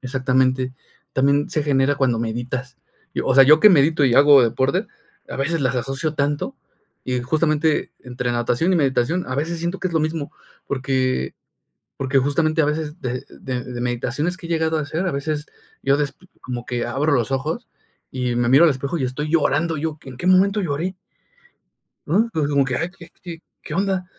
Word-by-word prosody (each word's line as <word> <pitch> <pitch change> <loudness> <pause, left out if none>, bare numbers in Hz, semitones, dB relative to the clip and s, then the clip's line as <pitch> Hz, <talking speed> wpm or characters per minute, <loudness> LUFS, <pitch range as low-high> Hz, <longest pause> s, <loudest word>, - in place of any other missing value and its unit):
exactamente, 130 -1 0 0.4
también 140 +2 +2
se 155 - 0
genera 140 -1 +2
cuando 125 -4 +1
meditas. 120 +3 -4 0.4
Yo, - - -2
o 130 - +2
sea, 135 - +8
¿yo 155 +3 +6
qué 215 - +9
medito 155 -3 +4
y 125 -3 +3
hago 140 0 +7
deporte?, 130 +4 +1 0.4
a - - -6
veces 155 +4 -1
las 130 -1 0
asocio 135 +5 -2
tanto, 145 0 -1 0.5
y 125 -1 -1
justamente, 155 +3 +1
entre 125 -1 -4
natación 120 +9 +1
y - - +3
meditación, 140 +3 +1
a 130 - -3
veces 165 +4 -2
siento 170 +3 -3
que 185 - -1
es - - -9
lo 160 - +3
mismo, 155 -1 -3 0.3
porque 130 - -1 0.6
porque 135 0 0
justamente 155 +4 +2
a - - +3
veces, 150 +2 -3
de 125 -2 -4
de 125 -2 -5
de 125 -1 -7
meditaciones 125 +8 -2
que 170 -3 -10
he - - -12
llegado 160 -1 +1
a - - -1
hacer, 155 +5 -3
a - - 0
veces 150 +2 -3 0.4
yo 140 +1 +3
des 145 -1 -2 0.3
como 125 -1 -6
que 120 -1 -2
abro 140 +6 0
los 120 -5 +1
ojos 155 - -2 0.4
y 125 -2 -2
me 120 0 +1
miro 140 +5 +7
al 165 - +6
espejo 140 +5 -3
y 135 - -2
estoy 130 +4 -3
llorando 160 0 +1
yo, 155 0 -3
¿en 130 -2 -9
qué 175 - -6
momento 195 +3 +4
lloré? 170 +3 -2 1.1
Uh, 200 +9 +2
digo 150 -2 0
como 140 -1 +3
que, 125 -2 -2
ay, 170 +7 -2
¿qué 170 -1 -13
qué 170 -2 -8 0.2
qué 150 - -8
onda?, 190 0 0
140 Hz, 195 wpm, -21 LUFS, 130-160 Hz, 1.1 s, qué